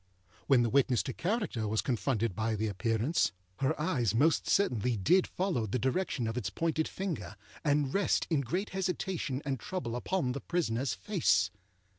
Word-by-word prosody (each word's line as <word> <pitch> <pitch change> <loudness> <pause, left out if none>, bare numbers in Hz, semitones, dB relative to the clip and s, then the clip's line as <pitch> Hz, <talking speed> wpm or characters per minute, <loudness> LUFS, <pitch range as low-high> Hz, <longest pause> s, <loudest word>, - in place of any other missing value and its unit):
When 130 -3 +5
the 115 - +1
witness 130 -3 +3
to 130 - -4
character 180 - -1
was 110 +1 +1
confronted 115 -5 0
by 110 +1 0
the 110 +1 -1
Appearance, 115 - +1 0.2
her 135 +4 0
eyes 125 -8 +1
most 145 +6 +3
certainly 125 - +2
did 175 - +3
follow 175 - -1
the 105 - -1
direction 130 +1 0
of 115 +2 -3
its 125 - -2
pointed 160 -1 0
finger, 185 - -4 0.3
and 145 -3 +2
rest 200 -1 +2
in 150 -4 +3
great 180 - -2
hesitation 180 -7 -2
and 135 -3 -1
trouble 120 -9 -4
upon 130 +1 -1
the 140 +1 -4
prisonerâs 130 -8 -1
face. 100 - +2
135 Hz, 165 wpm, -31 LUFS, 115-170 Hz, 0.3 s, When